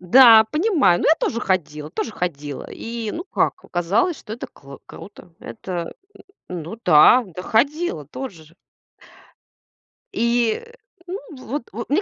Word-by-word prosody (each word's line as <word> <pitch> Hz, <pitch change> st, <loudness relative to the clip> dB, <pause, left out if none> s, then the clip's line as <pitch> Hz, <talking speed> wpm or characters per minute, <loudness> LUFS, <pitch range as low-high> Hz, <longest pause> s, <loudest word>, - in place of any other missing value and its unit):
Да, 225 Hz, +4 st, +8 dB
понимаю, 300 Hz, -, +2 dB
ну -, -, 0 dB
я 315 Hz, -, +7 dB
тоже 230 Hz, -, -2 dB
ходила, 155 Hz, -7 st, -2 dB
тоже 220 Hz, -, -4 dB
ходила! 145 Hz, -7 st, -5 dB
И, 230 Hz, -2 st, -5 dB
ну 345 Hz, -, -5 dB
как, -, -, 0 dB, 0.2 s
казалось, 200 Hz, -, +1 dB
что 210 Hz, -, -10 dB
это 240 Hz, -, -7 dB
кл 140 Hz, 0 st, -14 dB
круто. 195 Hz, -3 st, -13 dB
Это 170 Hz, +8 st, -6 dB, 0.6 s
ну 175 Hz, +3 st, -6 dB
да, 180 Hz, +10 st, +7 dB
да 180 Hz, -, -5 dB
ходила 275 Hz, -, 0 dB
тоже 175 Hz, -, -8 dB
же. 165 Hz, +3 st, -22 dB, 1.6 s
И, 235 Hz, -, +1 dB, 0.4 s
ну 365 Hz, +3 st, -5 dB, 0.3 s
вот 275 Hz, +3 st, -4 dB
вот, 235 Hz, +1 st, -6 dB
мне 300 Hz, +8 st, +2 dB
220 Hz, 140 wpm, -21 LUFS, 170-255 Hz, 1.6 s, Да